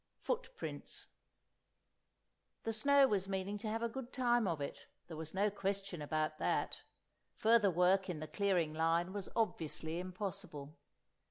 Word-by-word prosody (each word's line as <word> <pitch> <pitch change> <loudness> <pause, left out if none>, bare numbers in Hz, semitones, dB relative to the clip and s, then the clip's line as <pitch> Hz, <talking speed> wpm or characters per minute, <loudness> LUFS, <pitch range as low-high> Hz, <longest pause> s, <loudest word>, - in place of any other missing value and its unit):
X - - -49
Footprints 485 0 -3 1.6
THE 225 - -1
snow 280 +5 +5
was 195 -5 0
meaning 195 +2 -2
to 220 - -4
have 225 +2 -1
a - - +2
good 250 +1 -6
time 240 -4 +3
of 165 -4 0
it; 140 - -5 0.2
there 165 - -7
was 160 +2 -6
no 205 +2 +3
question 195 -3 -2
about 155 +1 -1
that. - - 0 0.6
Further 220 -2 +5
work 185 +2 +3
in 170 -4 -3
the 155 - -4
clearing 180 -3 +1
line 165 +3 +2
was 200 -2 -4
obviously 165 -6 -1
impossible. 180 -5 -5
195 Hz, 150 wpm, -36 LUFS, 165-215 Hz, 1.6 s, snow